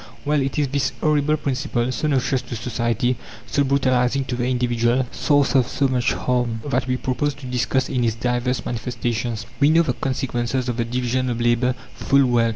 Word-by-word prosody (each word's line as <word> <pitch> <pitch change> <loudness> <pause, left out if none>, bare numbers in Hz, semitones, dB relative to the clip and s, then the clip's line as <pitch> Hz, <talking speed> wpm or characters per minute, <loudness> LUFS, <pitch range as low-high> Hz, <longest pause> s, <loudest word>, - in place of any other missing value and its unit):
Well, 150 0 +2
it 135 0 -2
is 145 -2 +2
this 140 -1 0
horrible 150 0 +2
principle, 135 -4 -1
so 130 +5 -1
noxious 135 -2 +1
to 120 -1 -7
society, 120 +1 -1 0.3
so 140 - +1
brutalizing 130 -1 +2
to 130 - -3
the 120 0 -1
individual, 120 0 +1
source 145 -2 +2
of 130 -3 +4
so 135 +1 +1
much 125 -2 +1
harm, 125 -2 -1
that 130 -3 0
we 125 0 0
propose 135 +3 -1
to 140 -1 -11
discuss 125 +1 0
in 125 -2 -1
its 115 -2 +1
divers 125 +1 -1
manifestations. 115 -1 -3
We 145 0 +5
know 165 +2 +5
the 130 - 0
consequences 130 -1 -2
of 120 -2 -2
the 115 - 0
division 125 +1 -1
of 120 -1 -2
labour 120 +2 +2 0.2
full 140 0 +3
well. 120 -2 +3
125 Hz, 190 wpm, -22 LUFS, 120-135 Hz, 0.3 s, We